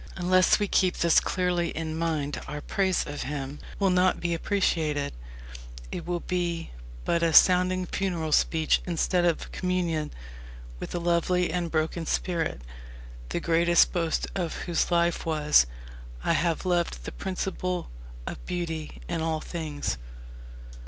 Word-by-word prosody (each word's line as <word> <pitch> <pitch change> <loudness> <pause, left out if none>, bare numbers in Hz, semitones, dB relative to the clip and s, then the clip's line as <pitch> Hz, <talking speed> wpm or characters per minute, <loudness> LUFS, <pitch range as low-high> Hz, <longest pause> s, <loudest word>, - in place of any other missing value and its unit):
Unless 185 +1 +4
we 205 - 0
keep 185 -2 +2
this 170 -1 +5
clearly 180 -2 0
in 160 0 -4
mind 155 -3 -1
our 150 - -4
praise 190 +4 0
of 145 0 -5
him 140 0 -4 0.2
will 195 -2 +2
not 180 +1 +3
be 170 -1 -1
appreciation. 160 -5 0 0.8
It 170 - -5
will 175 -1 -1
be 175 -2 -2 0.3
but 170 - +1
a 165 -1 +2
sounding 185 +1 +5
funeral 175 -4 -2
speech 160 +1 +3
instead 175 +1 +1
of 170 -2 0
communion 175 -4 -1 0.7
with - - -6
a - - 0
lovely 175 +1 +1
and 175 -2 -1
broken 160 +1 -1
spirit, 165 - -1 0.7
the - - -1
greatest 170 +1 +4
boast 165 -3 0
of 175 -4 -2
whose 170 -2 0
life 170 -1 +2
was: 150 - +4 0.6
"I - - +2
have 170 +2 0
loved 175 -2 0
the - - -6
principle 185 -2 -3 0.3
of - - -6
beauty 165 -3 -4
in 170 -2 -2
all 160 -1 0
things." 155 - -4
170 Hz, 140 wpm, -27 LUFS, 160-180 Hz, 0.8 s, this